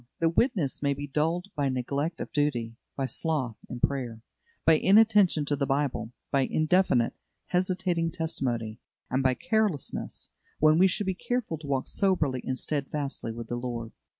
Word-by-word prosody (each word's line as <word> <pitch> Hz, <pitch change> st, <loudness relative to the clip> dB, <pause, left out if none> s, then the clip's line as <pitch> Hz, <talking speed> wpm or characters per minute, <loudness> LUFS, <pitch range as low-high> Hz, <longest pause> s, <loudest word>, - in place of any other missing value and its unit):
The 165 Hz, -, +3 dB
witness 170 Hz, -, +1 dB
may 140 Hz, -1 st, +1 dB
be 145 Hz, +1 st, -5 dB
dulled 165 Hz, +6 st, -1 dB
by 140 Hz, -2 st, +1 dB
neglect 140 Hz, +6 st, -2 dB
of -, -, -5 dB
duty, 120 Hz, -6 st, 0 dB, 0.2 s
by 135 Hz, -, 0 dB
sloth 130 Hz, -3 st, -2 dB
in 120 Hz, -, -5 dB
prayer, 120 Hz, -5 st, -1 dB, 0.4 s
by 160 Hz, -1 st, +6 dB
inattention 205 Hz, -6 st, +5 dB
to 145 Hz, -, 0 dB
the 140 Hz, -1 st, -1 dB
Bible, 135 Hz, -5 st, -1 dB, 0.2 s
by 135 Hz, -2 st, +2 dB
indefinite, 155 Hz, -7 st, +3 dB, 0.4 s
hesitating 180 Hz, -2 st, 0 dB
testimony, 120 Hz, -10 st, -3 dB, 0.3 s
and 130 Hz, +2 st, +2 dB
by 130 Hz, -1 st, +3 dB
carelessness, 220 Hz, -, -1 dB, 0.3 s
when 155 Hz, +1 st, +5 dB
we 190 Hz, -, +7 dB
should 195 Hz, +2 st, 0 dB
be 190 Hz, -, 0 dB
careful 220 Hz, -4 st, -2 dB
to 155 Hz, -, -9 dB
walk 135 Hz, -2 st, 0 dB
soberly 155 Hz, -10 st, +1 dB
and 130 Hz, -, -2 dB
steadfastly 140 Hz, -4 st, -3 dB
with 115 Hz, 0 st, -7 dB
the 120 Hz, -, -3 dB
Lord. 120 Hz, -2 st, -4 dB
145 Hz, 160 wpm, -28 LUFS, 130-175 Hz, 0.4 s, we